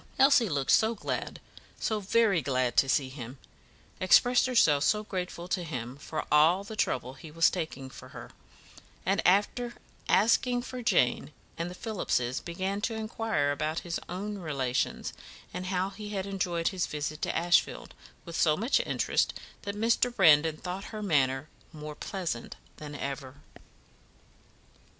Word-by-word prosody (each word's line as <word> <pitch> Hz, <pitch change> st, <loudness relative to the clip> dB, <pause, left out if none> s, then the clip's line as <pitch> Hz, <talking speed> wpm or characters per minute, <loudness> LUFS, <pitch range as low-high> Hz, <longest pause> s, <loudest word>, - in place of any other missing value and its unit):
Elsie 270 Hz, -5 st, +5 dB
looked 140 Hz, -4 st, 0 dB
so 220 Hz, +1 st, +4 dB
glad, -, -, -4 dB, 0.4 s
so 215 Hz, -1 st, 0 dB
very 205 Hz, -2 st, +3 dB
glad 130 Hz, -3 st, 0 dB
to 135 Hz, -, +4 dB
see 130 Hz, -1 st, +2 dB
him; 130 Hz, -1 st, -8 dB, 0.6 s
expressed 245 Hz, +7 st, +5 dB
herself 155 Hz, -, +4 dB
so 210 Hz, +4 st, +2 dB
grateful 180 Hz, -3 st, -5 dB
to 180 Hz, -1 st, -1 dB
him 125 Hz, -6 st, -5 dB
for 150 Hz, +2 st, -5 dB
all 160 Hz, +6 st, +5 dB
the 215 Hz, +2 st, -8 dB
trouble 130 Hz, -, -1 dB
he 160 Hz, +3 st, -11 dB
was 165 Hz, +2 st, +3 dB
taking 155 Hz, -7 st, -4 dB
for -, -, -12 dB
her; -, -, -10 dB, 0.7 s
and 195 Hz, +2 st, +2 dB
after 220 Hz, +6 st, +2 dB, 0.3 s
asking 245 Hz, +4 st, +3 dB
for 255 Hz, 0 st, -6 dB
Jane 150 Hz, -, +2 dB, 0.2 s
and 170 Hz, +1 st, -3 dB
the 180 Hz, -, -8 dB
Phillipses, 155 Hz, -, -1 dB
began 190 Hz, +4 st, -3 dB
to 225 Hz, +1 st, -1 dB
inquire 220 Hz, -9 st, -1 dB
about 155 Hz, +3 st, -2 dB
his 170 Hz, -1 st, -2 dB
own 200 Hz, +3 st, -4 dB
relations, 140 Hz, -7 st, -2 dB, 0.4 s
and 185 Hz, -, -4 dB
how 185 Hz, +1 st, -1 dB
he 210 Hz, +1 st, -8 dB
had 195 Hz, -2 st, -3 dB
enjoyed 180 Hz, -4 st, -1 dB
his 185 Hz, -3 st, -2 dB
visit 150 Hz, 0 st, -4 dB
to -, -, -1 dB
Ashfield, 175 Hz, +1 st, +1 dB, 0.3 s
with 170 Hz, -2 st, -7 dB
so 155 Hz, -3 st, +3 dB
much 235 Hz, -, +2 dB
interest, -, -, 0 dB, 0.3 s
that 200 Hz, 0 st, -5 dB
Mr. 230 Hz, +3 st, +2 dB
Brandon 160 Hz, -7 st, +5 dB
thought 185 Hz, +4 st, -5 dB
her 215 Hz, -1 st, -6 dB
manner 135 Hz, -6 st, +1 dB, 0.2 s
more 150 Hz, -1 st, -7 dB
pleasant 170 Hz, -8 st, -4 dB, 0.2 s
than 150 Hz, -1 st, -8 dB
ever. 135 Hz, -1 st, -5 dB
175 Hz, 150 wpm, -29 LUFS, 150-210 Hz, 0.7 s, Elsie